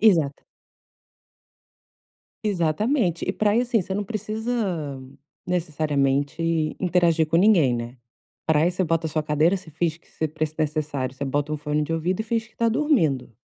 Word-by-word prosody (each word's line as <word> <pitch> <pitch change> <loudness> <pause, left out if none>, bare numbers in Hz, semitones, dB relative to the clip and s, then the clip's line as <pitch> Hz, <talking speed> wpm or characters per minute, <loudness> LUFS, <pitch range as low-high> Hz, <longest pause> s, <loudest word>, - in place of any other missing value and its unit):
Exata 165 -10 +3 2.0
Exatamente. 190 - +1
E 190 - +1
pra 210 +1 +2
ir, 240 - +4
assim, 240 -2 +1
você 190 +1 -4
não 205 +1 -1
precisa, 215 - -3 0.5
necessariamente, 155 -1 0
interagir 170 -3 +3
com 160 - +1
ninguém, 170 - +5
né. 120 +2 -5 0.5
Praia, 160 +2 +3
você 185 +1 -1
bota 165 0 0
a - - -4
sua 155 0 0
cadeira, 155 +5 +3
se 175 -3 -11
finge 165 +1 -1
que - - -29
se 160 - -3
pre 155 +1 -1
necessário, 150 -4 -1
você 140 - -4
bota 145 +2 -1
um 155 - 0
fone 150 +1 -1
de 155 +2 -3
ouvido 175 +5 -1
e - - +1
finge 225 0 -1
que 220 - -25
está 230 0 +1
dormindo. 165 - +1
165 Hz, 165 wpm, -24 LUFS, 150-200 Hz, 2.0 s, ninguém